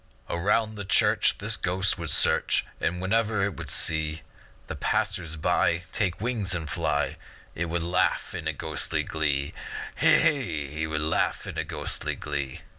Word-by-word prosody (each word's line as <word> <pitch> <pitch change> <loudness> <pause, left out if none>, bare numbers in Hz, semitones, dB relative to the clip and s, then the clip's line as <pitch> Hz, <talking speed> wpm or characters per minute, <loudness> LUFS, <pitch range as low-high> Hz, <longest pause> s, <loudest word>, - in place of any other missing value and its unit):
Around 105 +5 +1
the 105 - -4
church 95 - +3
This - - +1
Ghost 95 +1 0
would 85 -2 -4
search, - - +3
And 90 - -1
whenever 105 +2 +1
it 100 -3 -1
would - - -7
see 80 0 +3 0.4
The - - -6
passers 80 -1 -1
by 85 +2 +1
Take 95 -5 -1
wings 105 -5 0
and 80 -3 -4
fly 80 -1 -1 0.4
It 85 - -2
would 85 0 -2
laugh 90 +1 0
in 85 - -5
ghostly 80 -2 -1
glee, 70 -3 -1 0.4
Hee, - - +5 0.5
hee! 80 +2 -3
It - - -4
would 75 -1 -2
laugh 80 +1 0
in - - -6
ghostly - - -2
glee. 70 -3 -4
85 Hz, 155 wpm, -26 LUFS, 80-95 Hz, 0.5 s, Hee